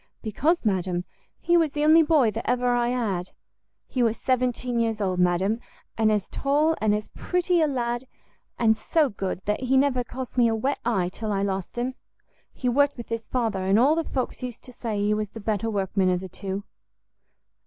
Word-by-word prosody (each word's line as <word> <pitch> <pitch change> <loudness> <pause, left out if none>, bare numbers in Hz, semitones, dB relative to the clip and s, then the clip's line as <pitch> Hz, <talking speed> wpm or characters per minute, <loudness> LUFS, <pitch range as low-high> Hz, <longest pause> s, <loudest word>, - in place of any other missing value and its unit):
"Because, 290 - 0
madam, 185 -3 0 0.3
he 345 - +2
was 325 -4 +3
the 295 - -1
only 315 +2 +7
boy 295 -8 +4
that 225 - -4
ever 250 0 +2
I 240 0 +2
had; 205 -8 -1 0.6
he 255 - -2
was 230 -1 +2
seventeen 250 -1 0
years 225 -2 0
old, 185 -3 -1
madam, 180 +5 +2 0.4
and 220 -1 +3
as 210 -2 0
tall 300 +3 +1
and 210 -1 +3
as 210 0 -4
pretty 360 -1 0
a 310 - +4
lad! 240 -2 -2 0.5
and 225 -2 +4
so 300 +6 +1
good, 195 -3 -4
that 210 0 0
he 260 +1 +2
never 265 -2 +2
cost 255 +1 -5
me 235 - +6
a 225 - +1
wet 265 +6 -1
eye 195 -7 +1
till 215 +3 -4
I 195 -1 0
lost 195 +1 -3
him. 250 +2 -1 0.6
He 255 - -4
worked 285 +3 +3
with 235 - -8
his 230 -1 -4
father, 225 -6 -1
and 195 +2 +3
all 265 +6 +5
the 330 +1 0
folks 260 -4 -3
used 250 -2 -6
to 250 - -12
say 225 -3 -4
he 205 +1 +2
was 210 -1 -2
the 225 - -9
better 215 +1 -1
workman 195 -2 +1
of 180 -1 +1
the 190 0 -8
two." 195 +2 -5
230 Hz, 205 wpm, -25 LUFS, 205-260 Hz, 0.6 s, only